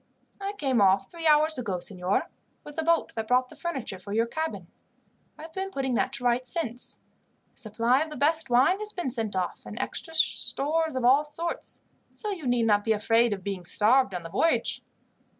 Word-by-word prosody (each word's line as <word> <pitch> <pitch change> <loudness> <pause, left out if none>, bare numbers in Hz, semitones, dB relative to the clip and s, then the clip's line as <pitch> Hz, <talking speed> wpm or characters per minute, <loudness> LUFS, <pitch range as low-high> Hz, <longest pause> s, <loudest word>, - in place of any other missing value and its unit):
"I 400 +1 -4
came 270 - 0
off 195 0 +3
three 335 -1 -3
hours 310 -1 +4
ago, 205 -7 -2
signor, 185 - -1 0.4
with 295 - -11
the 320 - -1
boat 335 +1 +1
that 220 -1 -4
brought 250 +1 +2
the - - -13
furniture 265 - -4
for 200 +2 -7
your 225 +2 +2
cabin. 315 +7 -4 0.7
I - - -11
have 320 0 -11
been 385 0 -3
putting 270 -7 -2
that 255 +2 +1
to 245 - -4
rights 245 +1 +1
since. 245 -8 -1 0.5
A - - -30
supply 230 +5 +1
of 315 - -2
the 300 - -8
best 305 +1 +3
wine 260 +11 +4
has 425 0 0
been 350 -8 -1
sent 225 -5 -1
off, 185 -1 -2
and - - -9
extra 325 -2 -4
stores 320 0 +1
of 255 -2 -1
all 270 +4 +5
sorts, 330 +3 -4 0.3
so 425 - -5
you 340 -9 -5
need 245 -2 +2
not 205 -2 +3
be 225 - +2
afraid 225 +2 +2
of 195 -2 -4
being 195 -2 -4
starved 215 +4 +2
on 175 - -4
the 165 - -7
voyage." 325 - +1
255 Hz, 205 wpm, -27 LUFS, 220-320 Hz, 0.7 s, all